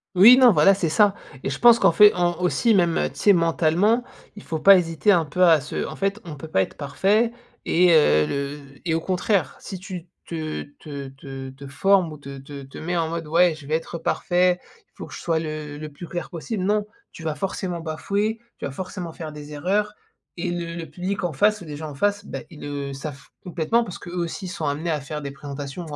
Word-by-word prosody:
Oui, 210 +7 +10
non, 255 -2 +8
voilà, 180 +2 +6
c'est 185 -4 -1
ça 200 +4 +4 0.3
et - - -2
je 135 - -3
pense 235 -1 +7
qu'en - - +4
fait, 210 +4 +8
en 175 -1 +1
aussi 220 +6 +2
même, 175 -4 +3
heu, - - +1
tu - - -18
sais, 205 - +5
mentalement, 170 +7 +2 0.3
il 205 - -11
faut 160 - -3
pas 195 +4 +8
hésiter 170 +4 +2
un 170 -3 +3
peu, 170 +5 +2
à 160 -4 +6
se - - -4
en - - -7
fait, 195 +2 -1
on 160 -3 -7
peut 155 +3 -9
pas 95 - +2
être - - -3
parfait 195 - +1 0.3
et 175 0 +4
heu, 110 - +5
le 140 +1 -3 0.2
et 165 - 0
au 165 - +1
contraire, 185 -2 0
si 190 - -7
tu 185 -2 -8 0.2
te 155 -2 -4 0.2
te 140 -2 -7
te 135 0 -9
te 135 +1 -12
formes 185 +4 +2
ou 155 - -8
te 140 -1 -9
te 140 +1 -9
te 135 - -12
mets 175 +2 -2
en 165 -1 +1
mode: 165 0 -4
«Ouais, 170 +1 +4
je 155 -2 -13
vais 155 - +1
être 165 +1 -4
parfait. 180 +2 +1 0.3
Il - - -47
faut - - -8
que - - -12
je - - -7
sois 165 -2 0
le 155 -2 -5
le 155 +1 -7
plus 150 +4 -10
clair 175 0 -5
possible». 185 +4 -4
Non! 210 +1 +1 0.3
Tu 165 - -10
vas 155 -2 -2
forcément 185 -2 -3
bafouer. 200 +7 -2 0.2
Tu - - -5
vas 140 - -4
forcément 180 +2 -6
faire 160 -2 -7
des 150 0 -9
erreurs 200 +8 0 0.4
et 175 0 -3
le 170 -1 -4
le 170 -1 -5
public, 185 +6 -4
en 175 - 0
face 210 +8 +2
ou - - -9
les 150 -2 -7
gens 155 0 -6
en - - -10
face, 205 +6 0
bah, - - -5
ils 160 -4 -13
le 140 -1 -4
savent 140 0 -8 0.2
complètement 180 +7 +1
parce 180 - -7
qu'eux 175 - -10
aussi 175 +2 -3
sont 180 -4 -4
amenés 150 +4 -2
à 150 - 0
faire 150 +2 -6
des 140 -1 -5
présentations 140 +3 -7
ou 150 -2 -7
165 Hz, 240 wpm, -23 LUFS, 150-190 Hz, 0.4 s, Oui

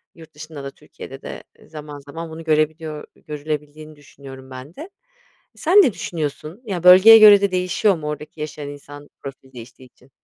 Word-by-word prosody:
Yurt 160 -2 -16
dışında 150 -2 -10
da, 140 - -7
Türkiye'de - - -13
de - - -9 0.2
zaman 150 -2 -10
zaman 160 +4 -9
bunu 165 +1 -9
görebiliyor 155 0 -2
görülebildiğini 150 0 -7
düşünüyorum 135 -2 -14
ben 130 +6 -11
de. 325 +6 -10 0.7
Sen 355 +6 +1
ne 245 - +1
düşünüyorsun? 155 - -6
Ya, 180 -5 -5
bölgeye 190 +5 +9
göre 205 -2 +8
de 200 -2 0
değişiyor 185 +2 0
mu 150 -1 -7
oradaki 150 +1 -8
yaşayan 150 -1 -7
insan 145 0 -12
profili 135 -1 -11
değiştiği 120 +2 -13
için? 130 +2 -27
150 Hz, 165 wpm, -20 LUFS, 145-175 Hz, 0.7 s, bölgeye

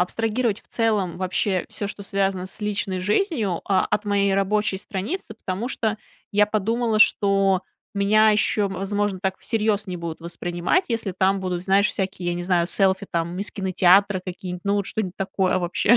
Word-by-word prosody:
абстрагировать 225 +3 0
в - - -27
целом 210 -6 0
вообще 185 0 0
всё, 205 - -3
что 200 0 -7
связано 195 -2 -1
с 205 - -5
личной 200 -2 -2
жизнью, 210 - 0
а, 195 -2 +2
от 210 +1 -1
моей 200 -1 +2
рабочей 200 0 +1
страницы. 215 - -5
Потому 205 +3 -4
что 220 -4 -1 0.4
я 205 0 +4
подумала, 220 +2 0
что 195 -3 +4 0.3
меня 215 +2 +4
еще, 210 -1 +2
возможно, 195 0 -2
так 190 -1 -1
всерьез 215 -2 0
не 180 -1 -4
будут 170 -1 -6
воспринимать, 175 - -1
если 225 -5 -2
там 190 +1 +2
будут, 180 -2 -3
знаешь, 195 +2 +3
всякие, 190 -2 -2
я - - -1
не 175 - -4
знаю, 175 -1 +1
селфи, 190 +1 +1
там, 170 +1 -2
из 200 0 -3
кинотеатра 190 0 +3
какие-нибудь, 180 0 -6
ну, 200 0 +1
вот, 200 -1 0
что-нить 190 -4 -2
такое, 190 -1 0
вообще, 185 +6 +3
195 Hz, 175 wpm, -23 LUFS, 185-210 Hz, 0.4 s, я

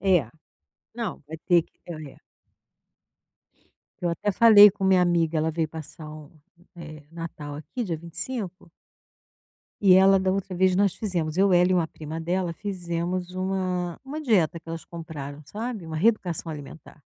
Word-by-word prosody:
É, 180 - +3 0.7
não 230 -6 -4
vai 160 +1 -7
ter 175 -1 +5
que, - - -34
é 155 -4 -7
é. - - -21 1.8
Eu 175 - 0
até 185 +5 -1
falei 210 0 +8
com 195 - -5
minha 190 -1 +5
amiga, 170 -2 +2
ela 160 +1 +1
veio 160 0 -1
passar 155 0 -9
o, 155 -1 -11 0.5
eh, 155 -3 -9
o - - -20
Natal 155 -3 -7
aqui 160 - -5
dia 175 -7 -2
25. 180 +3 -6 1.1
E 195 -3 +6
ela, 195 +1 +6
da 190 0 +1
outra 195 -1 -3
vez, 185 0 +3
nós 195 -1 +2
fizemos, 175 -7 -2
eu 195 0 +4
ela 180 +1 +5
e - - +4
uma 170 -3 +2
prima 160 0 -7
dela 175 +1 -1
fizemos 180 -1 -3
uma 185 -2 -2
uma 290 +3 -5
dieta 185 - +2
que 165 - -18
elas 165 0 -6
compraram, 150 -4 -8
sabe, 220 - -5
uma 160 -1 -5
reeducação 180 -4 +1
alimentar. 145 0 -10
175 Hz, 165 wpm, -25 LUFS, 160-190 Hz, 1.8 s, falei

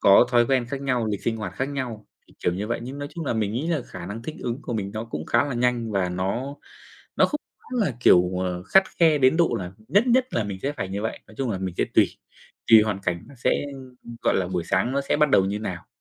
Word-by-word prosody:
có 100 0 +7
thói 120 -1 +4
quen 130 -2 +1
khác 135 +2 -4
nhau, 125 -4 0
lịch 105 -2 -3
sinh 115 - 0
hoạt 105 -4 -5
khác 130 +6 -2
nhau 125 -7 -5 0.2
thì, - - -22
kiểu 90 - +2
như 100 +3 -3
vậy, 115 - -2
nhưng 130 +4 -7
nói 145 0 -5
chung 170 - -4
là - - +1
mình 110 -3 -1
nghĩ 130 +8 -2
là 160 -6 0
khả 90 -1 -8
năng 105 +4 -6
thích 155 +6 -6
ứng 120 +3 -3
của - - -5
mình 100 -3 -2
nó 110 +1 -3
cũng 80 -9 -6
khá - - +3
là 140 -3 -3
nhanh 120 -1 0
và 95 -3 0
nó 100 +10 -2 0.6
nó - - +5
không 300 - -3 0.2
hẳn 255 -3 -4
là, 140 - -1
kiểu, 90 -6 +6
ờ, 90 -1 -2
khắt 190 - +5 0.2
khe 160 -3 +5
đến 130 +2 +4
độ 170 0 +3
là 90 -1 -6 0.2
nhất 205 +5 +4
nhất 255 +1 +4
là 110 - +1
mình 100 -2 -5
sẽ 140 - -1
phải 120 -10 -4
như 100 +2 -4
vậy, 110 - -3
nói 110 - -16
chung 130 -3 -1
là 95 - -2
mình 95 -2 -4
sẽ - - +3
tuỳ. - - +6 0.6
Tuỳ 110 -1 +9
hoàn 105 -2 -1
cảnh 85 -1 -2
nó 140 - -13
sẽ, - - +2
ừm, 125 -3 -12
gọi - - +2
là 90 -2 0
buổi 90 -2 -2
sáng 95 +8 +1
nó 140 - +1
sẽ 140 - 0
bắt 150 -1 +3
đầu 95 - +5
như 100 +2 -2
nào. 90 -5 -5
115 Hz, 280 wpm, -24 LUFS, 95-135 Hz, 0.6 s, Tuỳ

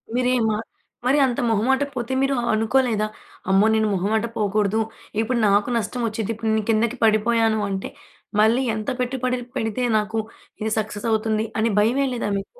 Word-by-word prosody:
మీరేమ 250 -2 +2 0.6
మరీ 265 +3 +3
అంత 245 -2 -1
మొహమాటకపోతే 260 +3 0
మీరు 270 0 +2
ఆహ్, 235 - -2
అనుకోలేదా? 225 -1 +1 0.4
అమ్మో! 195 +2 +5
నేను 220 -1 +2
మొహమాట 210 +4 0
పోకూడదు, 210 +1 +1 0.4
ఇప్పుడు 235 +2 0
నాకు 200 +3 +3
నష్టవొచ్చిద్ది, 230 -2 -2
ఇప్పుడు 225 0 -1
నే 220 - +1
కిందకి 230 +3 +1
పడిపోయాను 220 0 +3
అంటే, 195 -1 -3 0.5
మళ్ళీ 230 +4 +4
ఎంత 215 -1 -3
పెట్టుబడి 255 0 -1 0.2
పెడితే 225 0 -2
నాకు, 215 +1 -1 0.4
ఇది 220 0 -1
సక్సెసవుతుంది 220 +1 -1
అని 225 0 +2
భయమెయలేదా 245 +1 +1
మీకు? 340 - -12
225 Hz, 140 wpm, -22 LUFS, 215-250 Hz, 0.6 s, అమ్మో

